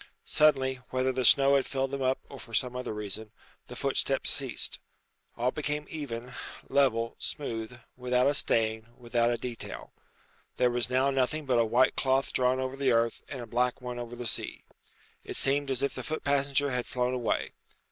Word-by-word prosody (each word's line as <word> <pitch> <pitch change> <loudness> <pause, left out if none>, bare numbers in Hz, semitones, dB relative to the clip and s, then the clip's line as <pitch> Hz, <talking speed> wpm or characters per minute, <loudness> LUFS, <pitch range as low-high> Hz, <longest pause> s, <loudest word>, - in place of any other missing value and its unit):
Suddenly, 135 -4 +3
whether 130 0 +1
the 130 0 -1
snow 140 +3 +6
had 135 - +2
filled 135 0 -1
them 140 -1 -3
up 130 0 +2
or 140 - -10
for 115 - -7
some 125 +2 +1
other 125 - -4
reason, 105 +1 -4 0.4
the - - -9
footsteps - - +1
ceased. - - 0 0.6
All 125 +2 +1
became 150 +1 -3
even, 125 -6 -6 0.4
level, 115 -5 +2
smooth, 120 -5 -4 0.2
without 125 0 +1
a 145 - +3
stain, 110 -4 +2
without 120 -1 +1
a 120 - 0
detail. 120 -1 -7 0.6
There 125 -1 +3
was 120 -1 +2
now 130 +2 +2
nothing 135 +3 0
but 125 -3 +2
a 115 - +4
white 120 +4 +3
cloth 135 0 +1
drawn 130 0 +2
over 130 0 -3
the 135 -1 +1
earth 115 0 +1
and 130 - -6
a - - -6
black 125 +2 0
one 125 -1 -6
over 120 0 -6
the 120 0 -6
sky. 110 - -4 0.6
It - - -6
seemed 140 +1 +3
as 135 0 +1
if 140 - 0
the - - -5
foot 155 - -4
passenger 140 0 +2
had 125 -1 -2
flown 125 0 -1
away. 125 -2 -1
125 Hz, 190 wpm, -29 LUFS, 120-135 Hz, 0.6 s, snow